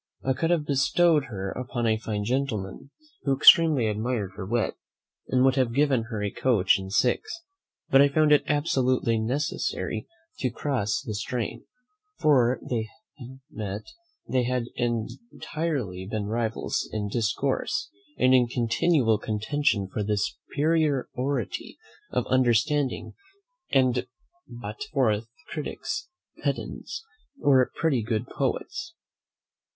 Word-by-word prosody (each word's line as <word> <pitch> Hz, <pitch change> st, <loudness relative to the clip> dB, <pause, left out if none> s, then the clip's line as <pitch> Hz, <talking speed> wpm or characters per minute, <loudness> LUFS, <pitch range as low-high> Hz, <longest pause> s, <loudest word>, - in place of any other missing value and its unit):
I 130 Hz, -, +2 dB
could 165 Hz, +5 st, -1 dB
have 170 Hz, -4 st, +2 dB
bestowed 150 Hz, +2 st, +3 dB
her 95 Hz, -4 st, -5 dB
upon 125 Hz, -1 st, -3 dB
a 110 Hz, -1 st, +3 dB
fine 110 Hz, -2 st, -3 dB
gentleman, 115 Hz, -3 st, -2 dB, 0.3 s
who 135 Hz, -1 st, +1 dB
extremely 155 Hz, -4 st, +7 dB
admired 110 Hz, -1 st, -1 dB
her 95 Hz, -, -6 dB
wit, 115 Hz, +1 st, 0 dB, 0.5 s
and 130 Hz, 0 st, +3 dB
would 135 Hz, +1 st, +3 dB
have 125 Hz, -3 st, +1 dB
given 135 Hz, -5 st, +2 dB
her 110 Hz, -3 st, -4 dB
a 100 Hz, -, -1 dB
coach 105 Hz, -6 st, +3 dB
and 95 Hz, 0 st, -7 dB
six, 335 Hz, -, 0 dB, 0.5 s
but 135 Hz, -, +7 dB
I 140 Hz, -, +6 dB
found 155 Hz, +1 st, +3 dB
it 150 Hz, -, +6 dB
absolutely 130 Hz, -6 st, +1 dB
necessary 130 Hz, +7 st, -2 dB, 0.3 s
to 130 Hz, -, 0 dB
cross 120 Hz, -3 st, -1 dB
the 110 Hz, -, -3 dB
strain; 115 Hz, +2 st, -3 dB, 0.5 s
for 130 Hz, -5 st, +4 dB
had -, -, -13 dB
they 115 Hz, -3 st, -1 dB, 0.6 s
met, 100 Hz, -3 st, -5 dB, 0.4 s
they 130 Hz, -, +1 dB
had 125 Hz, -1 st, 0 dB
entirely 120 Hz, -, -3 dB
been 110 Hz, -2 st, -2 dB
rivals 110 Hz, +1 st, -2 dB
in 105 Hz, -1 st, -2 dB
discourse, 130 Hz, -, -1 dB, 0.3 s
and 130 Hz, 0 st, +4 dB
in 125 Hz, -2 st, +5 dB
continual 120 Hz, 0 st, +2 dB
contention 110 Hz, 0 st, 0 dB
for 105 Hz, -, -4 dB
the 105 Hz, 0 st, 0 dB
superiority 145 Hz, +2 st, -1 dB, 0.3 s
of -, -, -1 dB
understanding, 130 Hz, +2 st, +1 dB, 0.6 s
and 130 Hz, -2 st, +2 dB, 0.4 s
brought 115 Hz, -2 st, -8 dB
forth 115 Hz, -6 st, +1 dB, 0.2 s
critics, 290 Hz, -, -4 dB, 0.4 s
pedants, 390 Hz, +3 st, -3 dB, 0.3 s
or 130 Hz, -3 st, +4 dB
pretty 145 Hz, -7 st, +1 dB
good 110 Hz, +1 st, -1 dB
poets. 335 Hz, -, -3 dB
125 Hz, 125 wpm, -26 LUFS, 110-145 Hz, 0.6 s, extremely